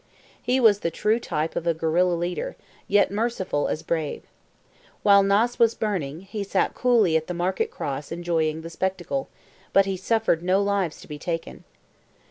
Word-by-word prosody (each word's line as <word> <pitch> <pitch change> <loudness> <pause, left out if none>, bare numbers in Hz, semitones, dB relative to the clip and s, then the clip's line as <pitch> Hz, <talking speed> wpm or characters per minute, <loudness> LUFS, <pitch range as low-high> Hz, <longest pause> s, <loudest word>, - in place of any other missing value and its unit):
He 250 +2 +1
was 220 -5 +5
the 170 - -1
true 215 +6 +1
type 155 -7 -3
of 170 - -3
a 165 - +2
guerilla 170 +3 +2
leader, 180 - -3 0.3
yet 205 -1 +3
merciful 200 -8 -1
as 160 - -3
brave. 160 -3 -2 0.8
While 200 -1 +7
Naas 205 +5 +2
was 230 -1 +4
burning, 170 -8 -2
he 200 +2 -5
sat 195 -1 0
coolly 230 -9 +3
at 160 0 +1
the 180 - -4
market 180 +2 -1
cross 140 0 -5
enjoying 165 -2 -1
the 165 - -7
spectacle, 190 +10 -2 0.4
but 195 - +6
he 195 -1 -2
suffered 220 -3 +1
no 185 +2 +2
lives 200 -5 0
to - - -13
be 150 -1 -7
taken. 165 +1 -5
185 Hz, 170 wpm, -24 LUFS, 165-205 Hz, 0.8 s, While